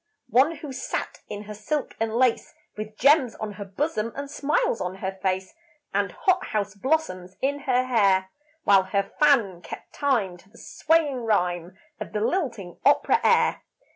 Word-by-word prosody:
One 275 Hz, +7 st, +4 dB
who 290 Hz, -2 st, -8 dB
sat -, -, -4 dB
in 205 Hz, 0 st, -6 dB
her 210 Hz, 0 st, -8 dB
silk 260 Hz, +8 st, -3 dB
and 225 Hz, 0 st, 0 dB
lace, 250 Hz, -1 st, +1 dB, 0.2 s
With 215 Hz, 0 st, -7 dB
gems 275 Hz, -3 st, +4 dB
on 215 Hz, -1 st, -5 dB
her 205 Hz, 0 st, -7 dB
bosom 230 Hz, +2 st, -2 dB
and 280 Hz, 0 st, -6 dB
smiles 285 Hz, -6 st, 0 dB
on 180 Hz, +1 st, -3 dB
her 190 Hz, 0 st, -5 dB
face, 190 Hz, -1 st, -1 dB, 0.4 s
And -, -, 0 dB
hot 375 Hz, -3 st, +1 dB
house 205 Hz, -2 st, -2 dB
blossoms 200 Hz, -, -1 dB
in 285 Hz, +2 st, 0 dB
her 255 Hz, -1 st, +3 dB
hair, 195 Hz, -6 st, +2 dB, 0.3 s
While 195 Hz, -1 st, +6 dB
her 200 Hz, +1 st, -1 dB
fan 235 Hz, -, +3 dB
kept -, -, -10 dB
time 230 Hz, -11 st, 0 dB
to 190 Hz, +2 st, -22 dB
the 230 Hz, -, -19 dB
swaying 300 Hz, -6 st, 0 dB
rhyme 180 Hz, -4 st, 0 dB, 0.2 s
Of -, -, -7 dB
the 210 Hz, -, -1 dB
lilting 230 Hz, -, -2 dB
opera -, -, +4 dB
air. -, -, +3 dB
220 Hz, 170 wpm, -25 LUFS, 195-280 Hz, 0.4 s, While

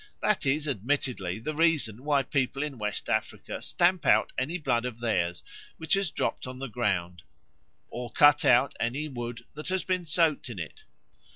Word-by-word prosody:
That 210 Hz, -9 st, +1 dB
is 145 Hz, +3 st, +1 dB
admittedly 120 Hz, -6 st, -1 dB
the 135 Hz, +8 st, -4 dB
reason 150 Hz, -8 st, +1 dB
why 145 Hz, -2 st, +2 dB
people 135 Hz, 0 st, -1 dB
in 140 Hz, -5 st, -5 dB
West 105 Hz, -1 st, -3 dB
Africa -, -, -2 dB
stamp 175 Hz, 0 st, +2 dB
out -, -, +4 dB
any 150 Hz, +8 st, -1 dB
blood 130 Hz, -8 st, 0 dB
of 125 Hz, -2 st, -5 dB
theirs 90 Hz, -7 st, -1 dB, 0.3 s
which 160 Hz, -1 st, -1 dB
has 195 Hz, -2 st, +2 dB
dropped 145 Hz, -, -2 dB
on 125 Hz, 0 st, -7 dB
the 135 Hz, -, -5 dB
ground 95 Hz, -8 st, -1 dB, 0.7 s
or 120 Hz, 0 st, -6 dB
cut 145 Hz, 0 st, +6 dB
out 140 Hz, -, +4 dB
any 130 Hz, +6 st, -1 dB
wood 120 Hz, -3 st, -6 dB
that 150 Hz, +1 st, -8 dB
has 185 Hz, -2 st, 0 dB
been 185 Hz, -2 st, -1 dB
soaked 155 Hz, -4 st, +2 dB
with 115 Hz, -, -7 dB
it. 80 Hz, -5 st, -8 dB
135 Hz, 175 wpm, -28 LUFS, 115-155 Hz, 0.7 s, cut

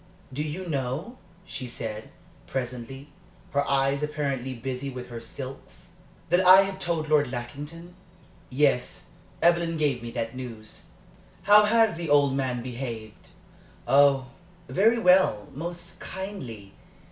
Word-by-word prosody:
"Do 145 Hz, -, -2 dB
you 155 Hz, +5 st, -4 dB
know," 150 Hz, -, -3 dB, 0.3 s
she 130 Hz, -7 st, -6 dB
said, 110 Hz, -2 st, -6 dB, 0.4 s
presently, 130 Hz, +2 st, -5 dB, 0.4 s
her 140 Hz, 0 st, +2 dB
eyes 140 Hz, +1 st, +2 dB
apparently 140 Hz, -4 st, -2 dB
busy 130 Hz, +3 st, -4 dB
with 125 Hz, -2 st, -8 dB
her 120 Hz, -1 st, -7 dB
silks, 130 Hz, +3 st, -9 dB, 0.4 s
"that 175 Hz, +3 st, +4 dB
I 185 Hz, +1 st, +9 dB
have 195 Hz, -1 st, -5 dB
told 170 Hz, -4 st, -1 dB
Lord 145 Hz, -4 st, +3 dB
Lackington?" 145 Hz, +8 st, -7 dB, 0.6 s
"Yes. 130 Hz, -2 st, 0 dB, 0.3 s
Evelyn 170 Hz, -1 st, +3 dB
gave 145 Hz, -5 st, +1 dB
me 120 Hz, -, -6 dB
that 115 Hz, 0 st, -4 dB
news. 115 Hz, -4 st, -9 dB, 0.6 s
How 210 Hz, +1 st, +7 dB
has 225 Hz, -4 st, +3 dB
the 170 Hz, -2 st, -4 dB
old 145 Hz, -2 st, +4 dB
man 130 Hz, -3 st, -1 dB
behaved?" 120 Hz, -4 st, -7 dB, 0.6 s
"Oh, 135 Hz, -2 st, +4 dB, 0.4 s
very 225 Hz, +5 st, +3 dB
well 180 Hz, -, +4 dB
most 170 Hz, +4 st, -6 dB
kindly. 130 Hz, -, -7 dB
140 Hz, 125 wpm, -26 LUFS, 125-170 Hz, 0.6 s, I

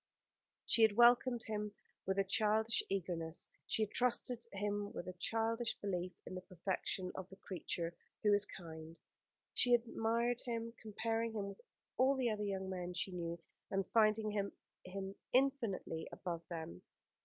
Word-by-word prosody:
She 230 Hz, -, +3 dB
had 220 Hz, -2 st, +7 dB
welcomed 240 Hz, 0 st, +6 dB
him 210 Hz, -1 st, -3 dB, 0.3 s
with 190 Hz, 0 st, +1 dB
a 195 Hz, -, +5 dB
childish 215 Hz, +3 st, +3 dB
eagerness, 170 Hz, -4 st, -2 dB, 0.2 s
she 220 Hz, -, +1 dB
had 210 Hz, -, -2 dB
trusted 245 Hz, -1 st, +1 dB
him 205 Hz, 0 st, -1 dB
with 175 Hz, -, -5 dB
a 185 Hz, -, -4 dB
childish 225 Hz, +5 st, 0 dB
belief 180 Hz, -2 st, -2 dB
in -, -, -6 dB
the 185 Hz, -, -4 dB
perfection 185 Hz, +1 st, -2 dB
of 190 Hz, -1 st, -6 dB
the 190 Hz, -, -11 dB
creature 175 Hz, -3 st, -3 dB, 0.3 s
who 210 Hz, -1 st, +6 dB
is 205 Hz, 0 st, +4 dB
kind. 160 Hz, -2 st, -9 dB, 0.6 s
She 245 Hz, -1 st, +5 dB
had 240 Hz, -, +7 dB
admired 235 Hz, +1 st, +1 dB
him 230 Hz, -1 st, -3 dB
comparing 225 Hz, +1 st, -1 dB
him 205 Hz, -2 st, -2 dB
with 200 Hz, -, -10 dB, 0.4 s
all 265 Hz, +2 st, +5 dB
the 250 Hz, -3 st, +2 dB
other 210 Hz, -1 st, -1 dB
young 190 Hz, -1 st, -2 dB
men 180 Hz, -1 st, -3 dB
she 190 Hz, -, -2 dB
knew, 170 Hz, -1 st, -3 dB, 0.3 s
and 195 Hz, -1 st, +1 dB
finding 215 Hz, -1 st, +4 dB
him 200 Hz, -1 st, 0 dB, 0.8 s
infinitely 245 Hz, -, +1 dB
above 170 Hz, -2 st, -4 dB
them. 160 Hz, -, -5 dB
205 Hz, 155 wpm, -38 LUFS, 185-230 Hz, 0.8 s, had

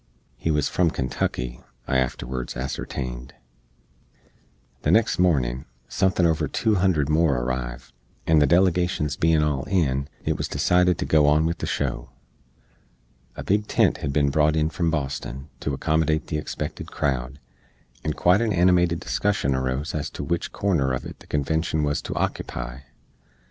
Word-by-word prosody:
He -, -, -3 dB
wuz 75 Hz, -2 st, +2 dB
from 90 Hz, -2 st, +2 dB
Kentucky, 65 Hz, -3 st, -3 dB, 0.3 s
I 65 Hz, -, +2 dB
afterwards 65 Hz, -1 st, -3 dB
ascertained. 65 Hz, -1 st, -5 dB, 1.5 s
The -, -, 0 dB
next 110 Hz, -4 st, +3 dB
mornin, 65 Hz, -7 st, +1 dB, 0.2 s
suthin 95 Hz, +5 st, +1 dB
over 80 Hz, -2 st, +1 dB
two 110 Hz, -, +1 dB
hundred 90 Hz, -7 st, +2 dB
more 75 Hz, -3 st, +3 dB
arriv; -, -, -4 dB, 0.3 s
and 80 Hz, -1 st, +4 dB
the 75 Hz, -, +4 dB
delegashens 90 Hz, -3 st, +2 dB
bein 80 Hz, 0 st, +3 dB
all 75 Hz, -3 st, 0 dB
in, 70 Hz, -8 st, 0 dB, 0.2 s
it -, -, 0 dB
wuz -, -, -1 dB
decided 90 Hz, -1 st, +2 dB
to -, -, -2 dB
go 75 Hz, -2 st, +4 dB
on 75 Hz, +2 st, +4 dB
with 85 Hz, +1 st, -1 dB
the -, -, -3 dB
show. -, -, -2 dB, 1.3 s
A -, -, -6 dB
big 105 Hz, +2 st, +1 dB
tent -, -, +2 dB
hed 70 Hz, -, -2 dB
bin 70 Hz, 0 st, +2 dB
brought 75 Hz, +1 st, +3 dB
on 80 Hz, 0 st, +1 dB
from 85 Hz, +1 st, 0 dB
Boston 70 Hz, -2 st, -4 dB
to 75 Hz, -, -2 dB
accommodate 80 Hz, +2 st, +1 dB
the 75 Hz, -, -2 dB
expected 75 Hz, -, -5 dB
crowd, 65 Hz, -2 st, -2 dB, 0.7 s
and 75 Hz, -1 st, -2 dB
quite 90 Hz, +5 st, +4 dB
an 110 Hz, -3 st, +1 dB
animated 90 Hz, -1 st, +3 dB
discussion 70 Hz, +3 st, 0 dB
arose 65 Hz, +3 st, -2 dB
ez 75 Hz, -2 st, -2 dB
to -, -, -6 dB
wich 85 Hz, +4 st, -2 dB
corner 70 Hz, -10 st, +1 dB
uv -, -, -11 dB
it -, -, -9 dB
the -, -, -17 dB
Convenshun 80 Hz, +2 st, 0 dB
wuz 75 Hz, 0 st, 0 dB
to -, -, -5 dB
ockepy. 65 Hz, +2 st, -3 dB
75 Hz, 160 wpm, -24 LUFS, 65-85 Hz, 1.5 s, and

